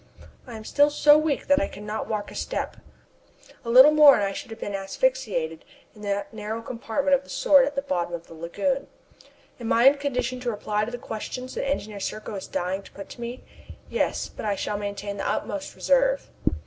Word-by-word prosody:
I 240 Hz, -, -8 dB
am 220 Hz, -, -9 dB
still 290 Hz, +4 st, +4 dB
so 295 Hz, 0 st, +6 dB
weak 305 Hz, -2 st, +1 dB
that 285 Hz, +1 st, +4 dB
I 295 Hz, -, 0 dB
could 205 Hz, -, -10 dB
not 210 Hz, +1 st, -4 dB
walk 210 Hz, -2 st, -3 dB
a -, -, -11 dB
step. -, -, -3 dB, 0.9 s
A 230 Hz, -, -6 dB
little 260 Hz, +5 st, +9 dB
more 300 Hz, -2 st, +8 dB
and 205 Hz, -, 0 dB
I 195 Hz, -, 0 dB
should -, -, -7 dB
have 225 Hz, -, -9 dB
been 205 Hz, -, -4 dB
asphyxiated -, -, -1 dB, 0.3 s
in 210 Hz, -, -15 dB
that 200 Hz, 0 st, -3 dB
narrow 220 Hz, +1 st, -5 dB
compartment 250 Hz, +4 st, -1 dB
of 275 Hz, 0 st, +3 dB
the -, -, -19 dB
Sword 275 Hz, -2 st, +5 dB
at 285 Hz, -, -4 dB
the 275 Hz, -, -1 dB
bottom 175 Hz, -10 st, -1 dB
of 170 Hz, 0 st, -9 dB
the -, -, -13 dB
lagoon. 200 Hz, -, -2 dB, 0.7 s
Am 230 Hz, -2 st, -3 dB
I 235 Hz, +2 st, +4 dB
in 280 Hz, +1 st, +7 dB
condition 255 Hz, -3 st, -2 dB
to 250 Hz, -1 st, -2 dB
reply 210 Hz, -1 st, -1 dB
to 235 Hz, -, -6 dB
the 245 Hz, -, -4 dB
questions 250 Hz, +3 st, -6 dB
that 275 Hz, -, -2 dB
Engineer 215 Hz, -7 st, -3 dB
Serko 215 Hz, +2 st, -5 dB
is 195 Hz, -2 st, -6 dB
dying 185 Hz, +2 st, -2 dB
to 195 Hz, -, -16 dB
put 200 Hz, -, -9 dB
to 240 Hz, -, -10 dB
me? 235 Hz, +2 st, -6 dB, 0.5 s
Yes -, -, 0 dB
but -, -, -10 dB
I 205 Hz, -2 st, 0 dB
shall 205 Hz, +1 st, -3 dB
maintain 200 Hz, 0 st, -5 dB
the 195 Hz, -, -2 dB
utmost 290 Hz, +7 st, -3 dB
reserve. -, -, +2 dB
235 Hz, 215 wpm, -25 LUFS, 205-280 Hz, 0.9 s, little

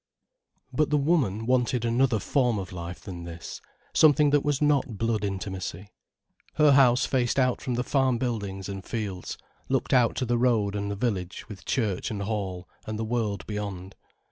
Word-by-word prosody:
But 155 Hz, -1 st, +2 dB
the 150 Hz, -, +3 dB
woman 140 Hz, -, +1 dB
wanted 125 Hz, -1 st, +1 dB
another 120 Hz, 0 st, +2 dB
form 125 Hz, +1 st, +1 dB
of 95 Hz, -2 st, -5 dB
life 85 Hz, -1 st, -7 dB
than 90 Hz, -4 st, -7 dB
this, 85 Hz, -1 st, -8 dB, 0.3 s
something 150 Hz, -1 st, +5 dB
that 145 Hz, -1 st, +3 dB
was 145 Hz, -2 st, +1 dB
not 145 Hz, -6 st, +1 dB
blood 115 Hz, 0 st, 0 dB
intimacy. 95 Hz, -1 st, -4 dB, 0.6 s
Her 150 Hz, -2 st, +5 dB
house 130 Hz, -1 st, +5 dB
faced 125 Hz, -2 st, 0 dB
out 125 Hz, -2 st, +2 dB
from 125 Hz, -3 st, -2 dB
the 125 Hz, -, 0 dB
farm 130 Hz, -2 st, +2 dB
buildings 100 Hz, -6 st, -3 dB
and 95 Hz, -1 st, -6 dB
fields, 100 Hz, -5 st, -4 dB, 0.3 s
looked -, -, 0 dB
out 125 Hz, -3 st, +4 dB
to 130 Hz, -, -1 dB
the 120 Hz, 0 st, +1 dB
road 110 Hz, -5 st, +2 dB
and 100 Hz, 0 st, -2 dB
the 100 Hz, -, -2 dB
village 100 Hz, -5 st, -3 dB
with 105 Hz, -3 st, -10 dB
church 110 Hz, -8 st, -1 dB
and 100 Hz, -2 st, -3 dB
Hall 95 Hz, -4 st, -3 dB, 0.2 s
and 110 Hz, 0 st, -3 dB
the 110 Hz, -, -2 dB
world 110 Hz, -4 st, -2 dB
beyond. 100 Hz, -3 st, -5 dB
110 Hz, 175 wpm, -27 LUFS, 100-130 Hz, 0.6 s, something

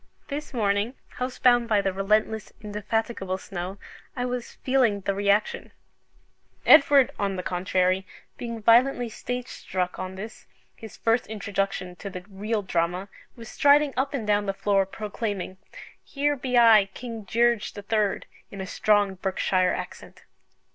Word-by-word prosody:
This 295 Hz, +1 st, -5 dB
morning, 210 Hz, +1 st, 0 dB
house 250 Hz, 0 st, -5 dB
bound 240 Hz, -1 st, +4 dB
by 210 Hz, -2 st, +4 dB
the 195 Hz, -1 st, 0 dB
relentless, 215 Hz, +3 st, 0 dB
indefatigable 210 Hz, -2 st, -3 dB
snow, 190 Hz, 0 st, -6 dB, 0.4 s
I 245 Hz, -1 st, -2 dB
was 250 Hz, -1 st, -4 dB
feeling 250 Hz, -6 st, +2 dB
the 195 Hz, -, -1 dB
reaction 200 Hz, +1 st, 0 dB, 0.9 s
Edward, 275 Hz, -3 st, +7 dB
on 195 Hz, -1 st, 0 dB
the 180 Hz, -, -4 dB
contrary, 185 Hz, +1 st, 0 dB, 0.3 s
being 235 Hz, -2 st, -6 dB
violently 245 Hz, +2 st, +4 dB
stage 245 Hz, +3 st, -5 dB
struck 180 Hz, -6 st, -4 dB
on 185 Hz, 0 st, -5 dB
this 215 Hz, +4 st, -9 dB, 0.3 s
his 220 Hz, -2 st, -11 dB
first 230 Hz, +1 st, +1 dB
introduction 195 Hz, -3 st, -3 dB
to 200 Hz, -, -6 dB
the 180 Hz, -2 st, -8 dB
real 210 Hz, +2 st, -2 dB
Drama, 180 Hz, +2 st, -1 dB, 0.3 s
was 230 Hz, -2 st, -11 dB
striding 285 Hz, +2 st, +4 dB
up 275 Hz, +2 st, -1 dB
and 235 Hz, -6 st, -3 dB
down 205 Hz, -1 st, +1 dB
the 195 Hz, -, -1 dB
floor, 195 Hz, -1 st, +1 dB
proclaiming 205 Hz, -2 st, -4 dB, 0.5 s
"Here 290 Hz, +1 st, 0 dB
be 255 Hz, -2 st, -1 dB
I, 225 Hz, -4 st, +7 dB
King 230 Hz, -3 st, -7 dB
Gearge 235 Hz, +2 st, +1 dB
the 205 Hz, -, -8 dB
Third," 210 Hz, -1 st, 0 dB, 0.2 s
in 195 Hz, -, -9 dB
a 190 Hz, -, -4 dB
strong 205 Hz, 0 st, +2 dB
Berkshire 185 Hz, -1 st, +1 dB
accent. -, -, -9 dB
210 Hz, 145 wpm, -26 LUFS, 195-240 Hz, 0.9 s, Edward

